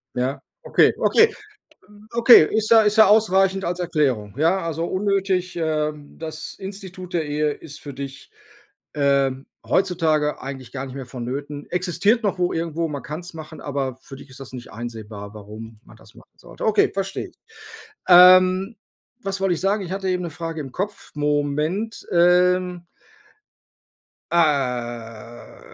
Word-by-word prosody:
Ja? 130 +2 -2 0.2
Okay, - - +4
okay. 450 -1 +4 0.8
Okay, 235 -7 +8
ist 215 0 0
ja 225 -1 +7
ist 210 +1 +2
ja 220 - +8
ausreichend 195 -2 +3
als 175 +1 -2
Erklärung. 135 - -1
Ja, 170 +5 +3
also 165 +1 -2
unnötig, 190 -1 -1
ähm, 150 -2 -3
das 160 -1 -6
Institut 190 -2 -8
der 165 -2 +1
Ehe 150 0 0
ist 155 +1 -10
für 140 -2 -9
dich, 135 0 -8 0.6
ähm, 140 -2 +1 0.2
heutzutage 160 -6 +1
eigentlich 135 -2 -8
garnicht 135 0 -6
mehr 135 -3 -6
von 125 -2 -7
Nöten. 145 +3 -5
Existiert 185 +6 +1
noch 195 -2 0
wo 180 0 +1
irgendwo, 165 0 -2
man 145 -2 -5
kann 155 +3 -6
es 175 0 -10
machen, 155 0 -9
aber 135 -3 -3
für 135 - -11
dich 140 - -14
ist 135 +1 -13
das 130 - -10
nicht 125 -3 -9
einsehbar 110 -3 -8
warum 110 +1 -10
man - - -17
das - - -18
machen - - -19
sollte. - - -10
Okay, 220 - +3
verstehe 195 0 -4
ich. - - -25 0.7
Ähm, 185 +3 +7 0.5
was 195 0 -3
wollte 190 -2 +2
ich - - -4
sagen? 195 +1 0
Ich 180 - -6
hatte 195 -1 -3
eben 180 -1 -1
'ne 170 - -4
Frage 165 0 -5
im 135 -3 -7
Kopf. 200 +2 -5
Moment. 150 +8 -1
Ähm, 180 0 +3 1.4
ah, 120 -7 -2
160 Hz, 155 wpm, -22 LUFS, 135-185 Hz, 1.4 s, Okay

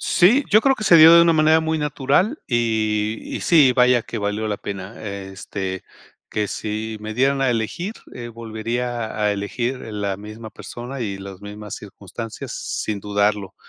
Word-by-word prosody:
Sí, 230 +11 +4
yo 215 +1 +7
creo 270 +1 +3
que 215 - -5
se 170 - +7
dio 160 +1 +10
de 170 - +8
una 170 -1 +4
manera 155 +1 +4
muy 160 0 -1
natural 150 - +1
y 110 -2 0 0.2
y - - -6
sí, 145 -7 +5
vaya 125 -1 +4
que 115 - -6
valió 105 +1 -2
la 105 - -1
pena, 100 +1 -7
este, 95 -1 -5 0.5
que 105 -1 -1
si 110 +1 -4
me 110 +1 -6
dieran 135 +3 +2
a 135 -2 +2
elegir, 145 - -2 0.2
eh, 120 -1 -7
volvería 115 +1 -4
a 105 -1 +2
elegir 120 +6 -3
la 100 -3 -3
misma 110 +2 -9
persona 125 +5 -8
y 100 -4 -3
las 95 -1 -9
mismas 105 +1 -8
circunstancias, 105 +2 -8
sin 105 -2 -3
dudarlo. 105 -1 0
110 Hz, 170 wpm, -22 LUFS, 105-135 Hz, 0.5 s, dio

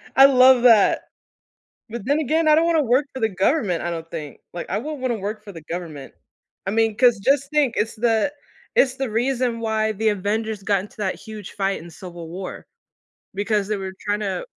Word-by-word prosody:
I 270 - +9
love 255 -2 +6
that. 225 -5 +5 0.9
But 235 -2 -5
then 285 +3 +1
again, 315 +2 +1
I 305 - +7
don't 325 +2 +4
wanna 330 -3 +3
work 260 +3 +2
for 260 - -5
the 225 - +2
government, 195 - 0
I 175 - -2
don't 165 -1 -6
think, 150 -3 -7
like, 175 - -6
I - - 0
won't 295 +3 -6
wanna 250 -3 -1
work 210 +2 -5
for 200 - -9
the 165 -3 -10
government. 155 -5 -7 0.5
I - - 0
mean, 225 0 +1
'cause 245 -4 +4
just 275 +6 +1
think, 290 -6 +2
it's 220 +1 -1
the 230 +4 +1 0.4
it's 260 -1 +3
the 270 -2 -2
reason 240 0 0
why 220 -1 0
the 220 +2 0
Avengers 210 +1 -2
got 200 -2 +2
into 205 - -12
that 195 -3 -2
huge 215 -3 -10
fight 195 -3 -1
in 170 +1 -11
Civil 170 -1 -10
War 185 +3 -7 0.7
because 205 0 0
they 215 -1 -1
were 190 -1 -6 0.2
tryna 205 - -1
220 Hz, 200 wpm, -22 LUFS, 195-255 Hz, 0.9 s, I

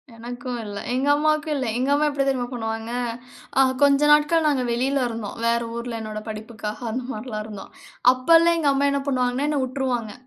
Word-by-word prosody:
எனக்கும் 245 +1 -6
இல்ல. 205 -1 -6 0.2
எங்க 265 +3 0
அம்மாவுக்கும் 305 +1 +1
இல்ல. 265 - -1
எங்க 260 +3 0
அம்மா 295 +1 +3
எப்டி 280 -1 0
தெரியுமா 260 -2 0
பண்ணுவாங்க, 225 -1 -4 0.7
அ - - +8 0.2
கொஞ்ச 280 0 +5
நாட்கள் 300 +2 +4
நாங்க 275 -4 +1
வெளியில 260 +3 +1
இருந்தோம், 225 -3 -6
வேற 235 0 +2
ஊர்ல 235 -1 -4
என்னோட 215 -1 -5
படிப்புக்காக 220 +1 -6
அந்த 250 +3 -3
மார்ல்லாம் 215 -2 -5
இருந்தோம். 210 -3 -9 0.4
அப்பல்லாம் 330 +6 +4
எங்க 295 -3 +2
அம்மா 280 +1 +2
என்ன 280 0 0
பண்ணுவாங்கன்னா 255 +1 0
என்ன 295 - 0
உட்ருவாங்க. 250 -4 -2
255 Hz, 175 wpm, -23 LUFS, 230-280 Hz, 0.7 s, அ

